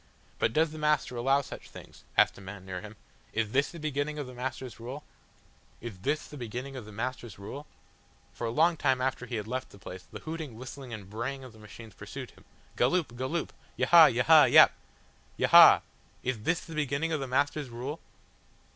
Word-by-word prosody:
"But 110 - +2
does 155 +5 +2
the 155 - -8
Master 150 -4 +1
allow 135 +4 +2
such - - -10
things?" - - -14
asked - - +5
a - - -13
man 95 0 -9
near 90 -1 -5
him. 105 0 -10 0.4
"Is 110 -1 -1
this 140 +3 +2
the 170 - -10
beginning 150 0 -2
of 145 - -3
the 125 - -10
Master's 125 -2 -6
rule?" 130 +5 -7 0.8
Is 110 -6 -8
this 145 +10 -1
the 150 - -10
beginning 125 +3 -6
of 125 -4 -7
the 110 - -11
Master's 120 -1 -5
rule? 135 +9 -8 0.7
For 115 +5 -4
a - - -1
long 160 +7 +3
time 130 -3 +2
after 130 -1 -2
he 120 - -4
had 105 -1 -4
left 130 +2 -4
the - - -15
place, 95 -1 -9
the - - -8
hooting, 160 -6 -6
whistling 130 +2 -9
and 105 -4 -7
braying 125 +6 -4
of 130 -3 -11
the 110 - -16
machines 110 0 -12
pursued - - -8
him; - - -21 0.3
"Galloop, 130 -1 +1
Galloop," 130 +7 -3 0.3
"Yahahah, - - +7
Yaha, - - +6
Yap! - - +9 0.7
Yaha!" - - +8 0.4
Is 125 -4 -2
this 165 +9 0
the 165 - -10
beginning 150 +1 -1
of 155 - 0
the 135 - -4
Master's 140 +2 0
rule? 125 +6 -5
130 Hz, 200 wpm, -29 LUFS, 115-145 Hz, 0.8 s, Yap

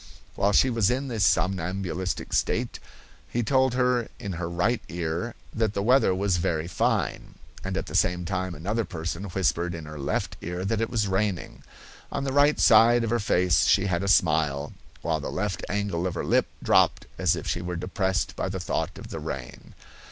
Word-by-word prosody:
While 100 - +1
she 130 +5 +4
was 115 -4 +2
in 130 +2 -1
the 115 -3 -3
somnambulistic 95 0 0
state - - 0 0.5
he 120 - -1
told 130 +2 +2
her 125 -2 +2
in 100 - -5
her 85 -1 -4
right 90 +8 0
ear 85 +6 -3 0.2
that 110 -2 0
the 100 - 0
weather 125 -5 +4
was 95 -1 +1
very 80 -1 -1
fine, 90 - -1 0.3
and - - -3
at - - -2
the - - -9
same 90 0 +1
time 95 -1 -2
another 105 +9 -1
person 85 0 -5
whispered 90 -2 0
in 80 -2 -7
her 75 0 -8
left 70 - -2
ear 90 +2 -4
that 110 +2 0
it 115 - 0
was 110 -4 0
raining. 95 -2 -2 0.5
On 140 - -2
the 135 -1 -2
right 145 +2 +4
side 115 +2 +6
of 115 - -1
her 120 - +2
face 90 -3 +2
she 100 - +4
had 90 -2 0
a 100 - -2
smile, 75 -6 +2 0.3
while 80 0 0
the 75 - -5
left 100 0 -3
angle 100 -4 -1
of 90 - -4
her - - -3
lip - - +2 0.2
dropped - - +3
as - - +3
if - - -6
she 85 - -1
were 90 0 -4
depressed 95 +2 -1
by - - -2
the 95 0 -4
thought 90 - -2
of - - -10
the - - -5
rain. 65 -2 -7
95 Hz, 195 wpm, -26 LUFS, 85-110 Hz, 0.5 s, side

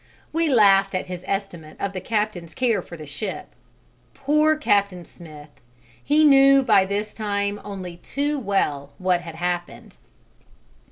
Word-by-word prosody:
We 330 0 +1
laughed 195 -6 +4
at 185 - -2
his 180 -1 -7
estimate 180 -6 -5
of 200 0 -3
the 185 - -5
captain's 210 -6 -3
care 235 -6 +1
for 170 - -11
the 155 - -9
ship. 170 +8 -6 0.7
Poor 300 +3 +2
Captain 200 - 0
Smith! 155 -3 -14 0.5
he 305 +1 +3
knew 275 -2 +6
by 205 -6 +4
this 205 +2 -3
time 205 -1 -2
only 185 -4 -7
too 285 +9 -3
well 150 - -1
what 180 -2 +1
had 165 -2 -9
happened. 175 +1 -5
200 Hz, 145 wpm, -23 LUFS, 175-235 Hz, 0.7 s, knew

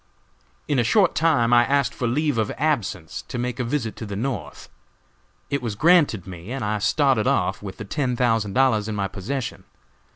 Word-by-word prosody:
"In 145 -3 +1
a - - +3
short 190 - +3
time 140 -8 +2
I 120 0 +7
asked 140 -1 +1
for 125 - -2
leave 145 0 0
of 110 - 0
absence 115 - -1
to - - -5
make 125 +1 -3
a - - 0
visit 120 -3 -2
to 115 - -6
the 100 - -5
North. 125 +5 -4 0.8
It 140 - 0
was 115 -4 -3
granted 150 - +3
me, 90 +2 -9
and 130 -4 -3
I 105 0 -1
started 130 0 +2
off, 95 +1 +1
with 100 -2 -8
the 110 - -7
ten 130 +3 -1
thousand 115 -5 +1
dollars 120 -5 +2
in 110 - -3
my 100 -1 -1
possession. 115 +7 -5
120 Hz, 195 wpm, -23 LUFS, 105-140 Hz, 0.8 s, I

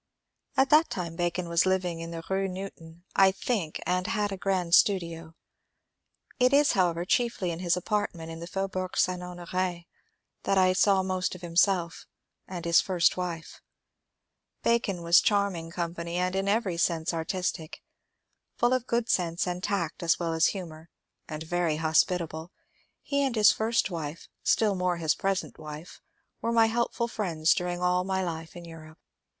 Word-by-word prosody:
At 270 0 +3
that 310 +2 +6
time 170 -3 -4
Bacon 175 0 -2
was 170 +2 +2
living 180 -3 0
in 165 0 -6
the 165 -1 -6
Rue 195 0 0
Newton, 175 -3 -9
I 190 0 +6
think, 190 -5 -2
and 180 0 0
had 210 -2 -1
a - - -2
grand 185 -3 -1
studio. 165 -5 +2 1.0
It 250 +1 +4
is, 285 +1 +5
however, 175 -2 +1
chiefly 230 -4 0
in 165 - -5
his 180 -1 +1
apartment 180 -4 -2
in 165 - -8
the 170 - -7
Faubourg 185 0 -3
St. 180 -1 +1
Honor^ 180 0 -4 0.6
that 195 - 0
I 185 -1 +4
saw 195 0 +3
most 185 -1 -2
of 180 - -11
himself 175 0 +1 0.4
and 175 -2 -6
his 170 0 +5
(first) 180 -4 +2
wife. 175 -3 -5 1.0
Bacon 205 -7 +1
was 170 +1 +6
charming 200 -5 0
company, 170 0 -4
and 180 +1 0
in 195 +1 -1
every 200 -4 0
sense 170 -1 0
artistic. 165 -1 -3 0.7
Full 240 +1 +2
of 255 -1 -1
good 235 0 0
sense 170 -5 0
and 180 0 -3
tact 195 -6 -2
as 170 -1 +2
well 165 -2 -2
as 160 0 +4
humour, 165 -4 -6 0.4
and 155 0 -6
very 170 -1 0
hospitable, 160 +1 0 0.5
he 280 0 0
and 265 -3 0
his 210 -3 +6
first 220 -2 0
wife 160 -2 -6
— - - -48
still 215 -2 +2
more 180 -2 0
his 160 -2 +1
present 195 -3 -2
wife 155 +2 -9 0.2
— - - -50
were 230 - -1
my 230 -1 +5
helpful 235 +1 -1
friends 170 -8 +1
during 180 0 -3
all 180 0 +2
my 190 0 -1
life 165 -2 -5
in 175 -1 -9
Europe. 160 -1 -12
180 Hz, 170 wpm, -28 LUFS, 170-195 Hz, 1.0 s, that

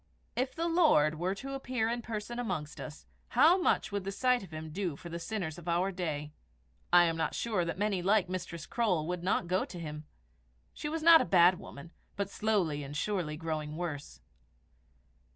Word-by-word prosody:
If 255 +1 -1
the 330 +1 -1
Lord 230 - +4
were 185 +3 0
to 275 +7 -6
appear 255 -4 -1
in 235 +1 -1
person 230 +1 -5
amongst 155 -11 -3
us, 155 0 -9 0.2
how 315 +10 +5
much 350 - +1
would 200 -1 -2
the 195 - -3
sight 250 +4 +2
of 190 - -10
him 155 0 -7
do 180 -2 -2
for 170 - -10
the 170 0 -5
sinners 175 -4 -4
of 175 - -13
our 175 +3 +1
day? 150 -5 -4 0.6
I 175 0 +8
am 165 -1 +1
not 160 - -1
sure 215 -6 0
that 170 +1 -3
many 200 -2 0
like 195 +1 +3
Mistress 175 -3 -5
Croale 190 -10 0
would 180 +1 -3
not 180 0 +1
go 185 +2 +1
to 180 - -8
him. 150 -2 -6 0.7
She 295 - -4
was 320 0 -3
not 330 -1 +9
a - - +2
bad 180 0 +5
woman, 145 +4 -11 0.2
but 200 -1 -3
slowly 190 -10 0
and 140 +2 -6
surely 175 -6 -1
growing 155 -1 -4
worse. 150 - -5
180 Hz, 195 wpm, -31 LUFS, 160-220 Hz, 0.7 s, not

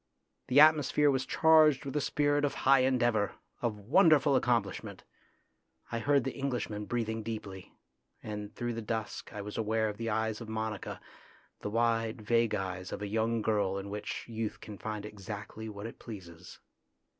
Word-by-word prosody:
The 130 +3 +5
atmosphere 150 -1 +6
was 130 -1 -1
charged 155 -4 +5
with 135 - -4
the 150 - 0
spirit 145 0 +1
of 145 - 0
high 135 0 +5
endeavour, 120 -5 +2 0.3
of 115 -3 -1
wonderful 145 - +4
accomplishment. 120 -3 0 0.9
I 115 - -1
heard 140 +1 +3
the 135 - -3
Englishman 120 -6 -3
breathing 110 -1 -2
deeply, 105 -4 -7 0.5
and 105 -1 -5
through 120 0 -2
the 115 - -4
dusk 110 0 -4
I 105 -2 -6
was 105 +2 -5
aware 110 0 +1
of 105 - -6
the 115 0 -3
eyes 110 +1 -1
of 115 - -7
Monica, 110 -2 -4 0.6
the - - -4
wide, 115 0 +1
vague 115 +1 +2
eyes 95 -1 -4
of - - -5
a - - -2
young 110 +2 0
girl 100 -3 +1
in 100 +1 -6
which 105 0 -5
youth 115 -2 -4
can 105 -2 -10
find 105 -1 -4
exactly 105 +1 -7
what 100 0 -8
it 115 - -8
pleases. 90 -7 -10
110 Hz, 165 wpm, -31 LUFS, 105-130 Hz, 0.9 s, atmosphere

